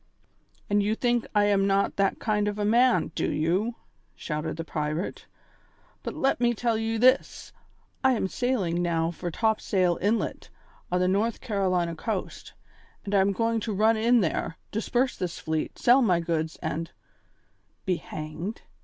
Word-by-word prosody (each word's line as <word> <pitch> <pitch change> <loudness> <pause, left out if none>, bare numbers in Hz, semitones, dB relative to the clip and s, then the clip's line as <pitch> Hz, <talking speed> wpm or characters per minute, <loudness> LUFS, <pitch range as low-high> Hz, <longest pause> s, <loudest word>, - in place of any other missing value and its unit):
"And 205 0 +2
you 210 +2 +1
think 240 -1 0
I 205 0 +5
am 200 -1 +3
not 195 0 +1
that 195 -1 +2
kind 210 -2 0
of 205 0 -2
a 205 - -1
man, 240 +1 +3
do - - -1
you?" 180 +10 0 0.4
shouted 150 0 -4
the 165 - -3
pirate. 155 +2 -3 0.7
"But - - -5
let 270 -2 +1
me 240 -1 +3
tell 230 +1 0
you 225 +1 -1
this. 255 +4 +2 0.5
I 260 0 +5
am 215 -5 0
sailing 190 -8 -1
now 165 -1 0
for 175 +1 -5
Topsail 185 -3 +1
Inlet, 215 +4 -1 0.4
on 180 - +2
the 180 - +3
North 205 +5 +1
Carolina 185 -7 0
coast, 200 +3 -5 0.5
and 200 - -4
I 200 - +5
am 195 +1 +3
going 230 +3 0
to 220 0 -3
run 220 +3 +4
in 235 +2 +3
there, 165 -1 -2
disperse 240 +4 0
this 180 -2 -4
fleet, 160 -1 -3
sell 250 +3 +5
my 185 -8 +3
goods, 160 -1 -2
and 165 +1 -3 0.5
" - - -42
"Be 185 -3 +1
hanged?" 155 +9 -6
200 Hz, 165 wpm, -27 LUFS, 170-225 Hz, 0.7 s, I